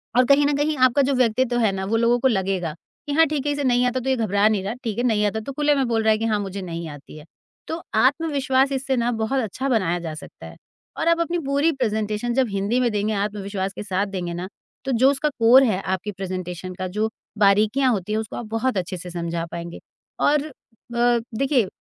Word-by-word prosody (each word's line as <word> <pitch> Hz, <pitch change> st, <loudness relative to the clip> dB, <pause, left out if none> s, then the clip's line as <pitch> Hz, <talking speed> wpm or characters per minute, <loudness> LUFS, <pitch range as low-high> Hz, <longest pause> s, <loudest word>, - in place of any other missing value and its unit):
और 250 Hz, +1 st, +5 dB
कहीं 280 Hz, +3 st, +5 dB
न 290 Hz, -, +2 dB
कहीं 300 Hz, +1 st, +1 dB
आपका 255 Hz, +3 st, +3 dB
जो 275 Hz, +1 st, +1 dB
व्यक्तित्व 250 Hz, 0 st, +1 dB
है 220 Hz, -4 st, +3 dB
ना, 190 Hz, 0 st, -3 dB
वो 225 Hz, +3 st, +1 dB
लोगों 235 Hz, +1 st, +3 dB
को 265 Hz, -, +3 dB
लगेगा 190 Hz, -7 st, -1 dB, 0.3 s
कि 285 Hz, -, -2 dB
हाँ, 325 Hz, +2 st, +5 dB
ठीक 295 Hz, -1 st, -2 dB
है, 290 Hz, -, +1 dB
इसे 290 Hz, 0 st, -2 dB
नहीं 250 Hz, -1 st, +3 dB
आता 255 Hz, +1 st, 0 dB
तो 265 Hz, +2 st, -3 dB
ये 265 Hz, -, +3 dB
घबरा 210 Hz, -3 st, +2 dB
नहीं 210 Hz, -3 st, +1 dB
रहा। 205 Hz, +4 st, -3 dB
ठीक 225 Hz, -2 st, -3 dB
है, 240 Hz, -, 0 dB
नहीं 220 Hz, -4 st, +2 dB
आता 210 Hz, +2 st, -1 dB
तो 220 Hz, +5 st, -6 dB
खुले 295 Hz, +1 st, +2 dB
में 270 Hz, -3 st, +1 dB
बोल 225 Hz, -1 st, 0 dB
रहा 220 Hz, -, +4 dB
है 215 Hz, -, +3 dB
कि 225 Hz, -, -2 dB
हाँ, 215 Hz, -2 st, +1 dB
मुझे 195 Hz, -1 st, -5 dB
नहीं 170 Hz, -2 st, -5 dB
आती 145 Hz, +1 st, -11 dB
है। 150 Hz, -, -12 dB, 0.4 s
तो 325 Hz, +1 st, -4 dB
आत्मविश्वास 275 Hz, +1 st, +2 dB
इससे 270 Hz, 0 st, -1 dB
ना 240 Hz, +1 st, +1 dB
बहुत 225 Hz, +4 st, -1 dB
अच्छा 260 Hz, +6 st, -3 dB
बनाया 180 Hz, -7 st, +1 dB
जा 165 Hz, -2 st, -5 dB
सकता 155 Hz, -, -11 dB
है। -, -, -10 dB, 0.4 s
और -, -, -1 dB
आप 335 Hz, 0 st, +4 dB
अपनी 340 Hz, +1 st, 0 dB
पूरी 285 Hz, +4 st, +2 dB
प्रेज़ेंटेशन 220 Hz, -2 st, -1 dB
जब 260 Hz, -1 st, +2 dB
हिंदी 200 Hz, +5 st, 0 dB
में 245 Hz, -2 st, +1 dB
देंगे, 210 Hz, +1 st, -1 dB
आत्मविश्वास 200 Hz, -1 st, -3 dB
के -, -, -6 dB
साथ 195 Hz, 0 st, -1 dB
देंगे 180 Hz, -3 st, -4 dB
ना, 180 Hz, +2 st, -5 dB, 0.4 s
तो 270 Hz, -, -1 dB
जो 260 Hz, +2 st, +4 dB
उसका 285 Hz, +2 st, 0 dB
कोर 240 Hz, +4 st, +7 dB
है, 205 Hz, -6 st, +1 dB
आपकी 190 Hz, +2 st, -3 dB
प्रेज़ेंटेशन 185 Hz, -1 st, -5 dB
का 185 Hz, -, -2 dB
जो 220 Hz, +1 st, +1 dB, 0.3 s
बारीकियाँ 215 Hz, +6 st, +3 dB
होती 210 Hz, -2 st, -2 dB
हैं, 220 Hz, -, +1 dB
उसको 220 Hz, -, -6 dB
आप 240 Hz, -, -5 dB
बहुत 225 Hz, +1 st, -1 dB
अच्छे 185 Hz, 0 st, -3 dB
से 180 Hz, +1 st, -8 dB
समझा 170 Hz, -1 st, -3 dB
पाएँगे। 170 Hz, 0 st, -6 dB, 0.4 s
और 295 Hz, 0 st, +2 dB, 0.5 s
अ, 240 Hz, 0 st, +3 dB, 0.2 s
देखिए, 265 Hz, -4 st, +2 dB
225 Hz, 240 wpm, -23 LUFS, 195-265 Hz, 0.5 s, कोर